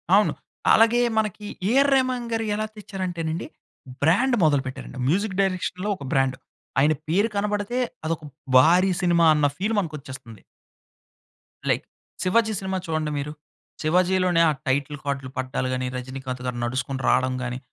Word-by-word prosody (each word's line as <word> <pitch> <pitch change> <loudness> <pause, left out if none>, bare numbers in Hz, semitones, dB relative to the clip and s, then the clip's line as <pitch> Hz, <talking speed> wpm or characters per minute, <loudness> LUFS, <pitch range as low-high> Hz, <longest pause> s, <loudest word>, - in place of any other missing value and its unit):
అవును. 210 +1 +4 0.4
అలాగే 230 +2 +5 0.2
మనకి 215 -1 -1 0.2
'ఏఆర్ 275 +5 +4
రెహమాన్' 255 -2 0
గారు 225 0 0
ఎలా 215 +1 -1
తెచ్చారంటేనండి. 180 -5 -4 0.5
బ్రాండ్ 235 - +3
మొదలు 145 -3 +4
పెట్టారండి. 130 0 -7
మ్యూజిక్ 190 +5 0
డైరెక్షన్‌లో 185 +1 -1
ఒక 165 - -10
బ్రాండ్. 135 -1 +2 0.4
ఆయన 150 +3 +4
పేరు 200 +8 +2
కనబడితే, 205 +3 -1 0.3
అదొక 160 0 -2 0.3
భారీ 175 +8 +5
సినిమా 170 -2 +4
అన్న 150 -1 +2
ఫీల్ 210 +4 -1
మనకొచ్చేస్తుంది. 130 - -7 1.3
లైక్ - - +1 0.4
'శివాజీ' 220 +3 +2
సినిమా 190 0 -2
చూడండి 155 -1 -1
మీరు. 150 +1 -4 0.5
'శివాజీ'లోనే 180 +1 +3
ఆ - - +3 0.2
టైటిల్ 140 +2 0
కార్డ్‌లు 135 -2 -3
పడ్డాలు 130 0 -2
గాని 130 0 -2
'రజినీకాంత్' 130 0 -6
గారు 125 -1 -3
నడుచుకుంటూ 130 +2 -3
రాడం 130 0 +2
గాని. 125 0 -4
170 Hz, 135 wpm, -24 LUFS, 135-205 Hz, 1.3 s, అలాగే